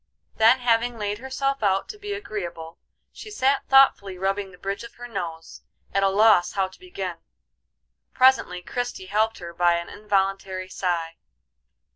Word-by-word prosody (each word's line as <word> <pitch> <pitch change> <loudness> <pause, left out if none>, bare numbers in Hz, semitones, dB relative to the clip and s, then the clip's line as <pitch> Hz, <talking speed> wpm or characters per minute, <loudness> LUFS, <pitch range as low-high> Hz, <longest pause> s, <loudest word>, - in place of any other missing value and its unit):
Then 230 +4 +5
having 240 0 +1
laid 205 0 -3
herself 275 +1 -2
out 195 -2 +1
to 420 - -8
be 410 0 -6
agreeable, 175 - -6 0.3
she 435 - -10
sat 280 -9 +1
thoughtfully 235 -8 +5
rubbing 195 +1 -2
the 180 - -15
bridge 195 +4 -4
of 235 - -11
her 245 0 -9
nose, 165 -7 -6 0.3
at 195 - +2
a 195 - +4
loss 195 -3 +4
how 195 -2 +1
to 190 - -18
begin. 370 +1 -6 0.9
Presently 255 -9 +3
Christie 245 -3 -4
helped 220 +1 +2
her 170 -1 -8
by 175 0 +3
an 170 0 -4
involuntary 195 -2 -1
sigh. 170 -3 -2
200 Hz, 155 wpm, -24 LUFS, 185-245 Hz, 0.9 s, Then